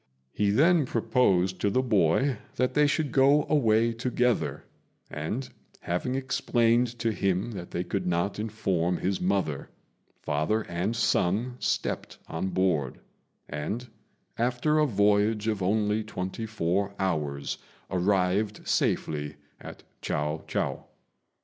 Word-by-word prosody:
He 105 -1 +1
then 155 - +4
proposed 105 -6 +1
to 100 - +2
the 130 +6 +1
boy 115 - +2 0.2
that 125 - 0
they 150 0 +4
should 145 -1 0
go 140 +3 +4
away 115 -5 +3
together; 125 +1 0 0.5
and, 95 - -3 0.3
having 90 +9 -2
explained 120 -2 +1
to 115 -1 0
him 100 +2 0
that 90 -5 -7
they 85 - -2
could 90 +1 -3
not 90 +4 0
inform 95 -5 0
his 95 +1 -1
mother, 90 -7 -1 0.5
father 75 +10 0
and 90 +6 -2
son 115 +2 +1
stepped - - -2
on 80 +4 -3
board, 85 -9 0 0.5
and, 105 +12 -4 0.5
after 125 +6 +2
a 150 - +4
voyage 105 0 +2
of 105 -3 0
only 105 +3 +1
twenty 105 +1 -5
four 100 -1 -1
hours, 75 -7 -2 0.3
arrived 95 +3 +1
safely 75 -1 0 0.2
at - - -10 0.2
Chiao 75 +1 -2
chou. - - -1
105 Hz, 125 wpm, -27 LUFS, 90-120 Hz, 0.5 s, then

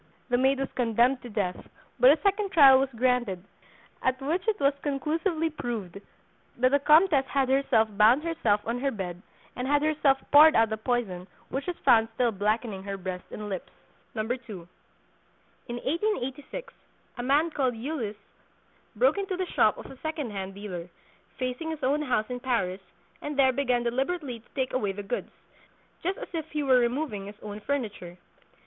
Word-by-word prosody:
The 245 - +3
maid 265 +1 +3
was 270 - -3
condemned 245 +1 +2
to 245 - -9
death; 200 -5 -3 0.3
but 250 +2 +8
a 300 - +5
second 400 0 +1
trial 275 -7 +8
was 270 0 0
granted, 240 -6 0 0.6
at 260 0 0
which 330 +9 -2
it 440 - +1
was 280 0 +3
conclusively 320 +3 -1
proved 225 - -5 0.6
that 255 +1 +3
the 285 - +4
Comtesse 300 -1 +4
had 270 -1 0
herself 265 -5 +3
bound 230 +8 +5
herself 235 -12 +1
on 235 +2 -2
her 275 +2 0
bed, 185 -7 -5 0.3
and 250 +1 -3
had 290 +1 +2
herself 300 -3 +3
poured 305 +2 +8
out 225 -1 +4
the 220 - -2
poison 215 -6 -2 0.2
which 275 +4 -4
was 360 - -3
found 225 -1 +5
still 240 -1 +2
blackening 210 0 -1
her 195 0 -5
breast 185 -1 -6
and 210 - -7
lips. 190 -3 -5 0.5
2. 215 - -1 1.4
In 240 - -4
1886 330 - -3 0.5
a - - 0
man 290 +6 +2
called 260 -5 0
Ulysse 230 -5 -4 0.8
broke - - +3
into 390 -2 -3
the 370 - -1
shop 215 -10 +2
of - - -9
a 270 - -11
second 310 -6 -3
hand 195 -1 -5
dealer, 185 -4 -7 0.5
facing 255 +5 -3
his 315 -1 -5
own 285 +3 +2
house 250 -7 0
in 250 -1 -5
Paris, 215 -7 -1 0.4
and 295 -1 -5
there 265 -2 +5
began 250 -3 +1
deliberately 265 +1 -2
to 225 - -27
take 260 -2 -1
away 205 -6 0
the 205 +1 -6
goods, 200 +5 -4 0.7
just 370 +3 -2
as - - -7
if 320 -2 -4
he 300 -1 -2
were 260 -2 +5
removing 240 -4 -1
his 205 - -9
own 210 0 -6
furniture. 210 -9 -4
255 Hz, 175 wpm, -27 LUFS, 215-295 Hz, 1.4 s, but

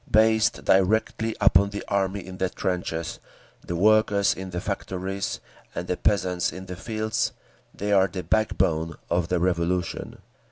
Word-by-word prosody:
Based 110 0 +3
directly 110 +3 +2
upon 100 -1 +5
the 100 0 -5
army 100 0 -1
in 95 0 -9
the 95 - +1
trenches, 85 -3 -3 0.4
the 85 - -4
workers 105 +1 +4
in 95 0 -7
the 90 -1 -3
factories, 95 0 -3 0.4
and 90 - -3
the 90 - 0
peasants 90 -3 +1
in 95 +3 -8
the 90 -1 -6
fields, 110 +3 -2 0.4
they 105 +1 -3
are 95 -1 +5
the 95 -2 -5
backbone 80 -6 +1 0.2
of 85 0 +1
the 90 0 +1
Revolution. 90 0 -1
95 Hz, 150 wpm, -25 LUFS, 90-105 Hz, 0.4 s, upon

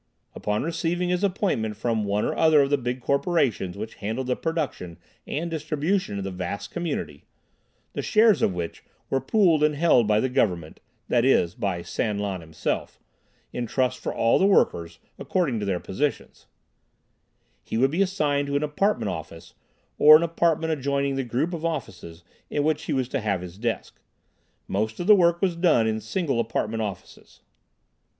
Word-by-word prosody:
Upon 105 0 -2
receiving 170 +2 -1
his 180 +2 0
appointment 180 - 0
from 110 -2 -1
one 100 +1 0
or - - 0
another 155 -3 +4
of 140 - -2
the 145 - +4
big 125 +1 -3
corporations 135 - 0
which 110 +2 -6
handled 110 +6 -2
the 125 0 0
production 150 - -3 0.3
and 165 +3 -3
distribution 155 - -1
of 100 - -3
the 95 - -4
vast 100 +3 -5
community 150 - -4 0.7
(the - - -3
shares 215 -2 +4
of - - +3
which 85 -1 -5 0.3
were 135 - +1
pooled 175 -9 +3
and 150 0 +3
held 145 -8 +4
by 105 0 +3
the 130 - +1
government 90 -10 -1 0.3
that 120 -1 +2
is, 90 -10 +3
by 90 -3 -3
San 105 +2 -2
Lan 100 -3 -3
himself 80 -1 -4 0.5
in 120 -1 -3
trust 130 +2 0
for - - -3
all 115 - +2
the 190 - +4
workers, 85 - +2 0.2
according 140 - 0
to 105 - -3
their 95 -3 0
positions) 140 +12 -3 1.2
he - - -4
would 135 +3 +3
be 170 +5 0
assigned 150 -7 0
to 140 - -2
an 145 - +1
apartment 150 - 0
office, 80 0 -8 0.5
or 155 +1 +10
an 165 - -1
apartment 165 -1 +1
adjoining 140 -1 -1
the 135 - -1
group 130 +9 -1
of 165 -2 -5
offices 95 - -5 0.3
in 145 - 0
which 155 0 0
he - - -3
was 130 -2 0
to 135 0 -2
have 100 -4 -1
his 90 +1 -9
desk. 115 0 -3 0.7
Most 110 +3 -2
of 175 - -2
the 210 - +8
work 170 -1 +3
was 180 -3 +2
done 165 -10 +3
in 110 0 -1
single 135 - -1
apartment 115 -1 -1
offices. 105 -3 -8
130 Hz, 175 wpm, -25 LUFS, 105-160 Hz, 1.2 s, or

